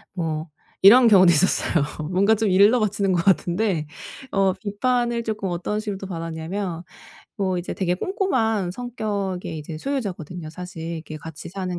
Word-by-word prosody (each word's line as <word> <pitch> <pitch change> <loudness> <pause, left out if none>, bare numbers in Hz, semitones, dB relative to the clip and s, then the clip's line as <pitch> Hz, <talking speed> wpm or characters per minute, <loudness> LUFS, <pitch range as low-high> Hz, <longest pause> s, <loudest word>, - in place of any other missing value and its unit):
뭐 160 -2 -3 0.3
이런 235 +6 +8
경우도 185 -5 +7
있었어요. 170 -2 +2 0.3
뭔가 200 +4 +4
좀 220 -1 0
일러바치는 200 0 +3
것 170 -1 +1
같은데 180 -3 +1 0.4
어 195 -1 +2
비판을 235 +4 -1
조금 215 -3 -3
어떤 180 +4 -2
식으로 210 -2 -4
또 195 - -8
받았냐면 165 +1 -4 0.5
뭐 190 -2 0
이제 175 - -5
되게 180 -2 0
꼼꼼한 225 - 0
성격의 200 -6 -4
이제 155 +1 -7
소유자거든요 180 - -4
사실 180 0 -8
이렇게 160 -1 -7
같이 160 +1 -9
사는 180 -1 -4
190 Hz, 335 characters per minute, -23 LUFS, 175-215 Hz, 0.5 s, 이런